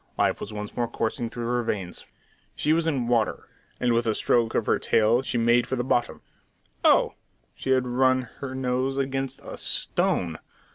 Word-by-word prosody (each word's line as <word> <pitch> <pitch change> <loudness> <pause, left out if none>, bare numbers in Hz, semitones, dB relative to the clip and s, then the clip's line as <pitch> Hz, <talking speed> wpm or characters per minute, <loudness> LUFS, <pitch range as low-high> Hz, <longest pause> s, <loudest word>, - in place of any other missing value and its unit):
Life - - +2
was 100 - -6
once 105 -1 -6
more 120 -1 0
coursing 115 +1 -2
through 120 0 -5
her 120 +1 +1
veins. 95 -6 -4 0.5
She 155 - +2
was 165 0 +1
in 135 -7 0
water, 115 -3 0 0.3
and 120 -1 +2
with 115 0 +1
a 110 - +1
stroke 115 -2 +2
of - - +1
her - - +2
tail 115 +3 +3
she 125 - -2
made 120 +1 +3
for 130 - -1
the 120 - -1
bottom. 120 -1 0 0.6
Oh! - - +5 0.4
She - - -7
had 130 -1 +3
run 130 +1 +2 0.2
her 130 -2 -5
nose 130 +1 -1
against 135 0 -2
a - - -8
"stone!" 85 -3 -1
120 Hz, 185 wpm, -26 LUFS, 115-130 Hz, 0.6 s, Oh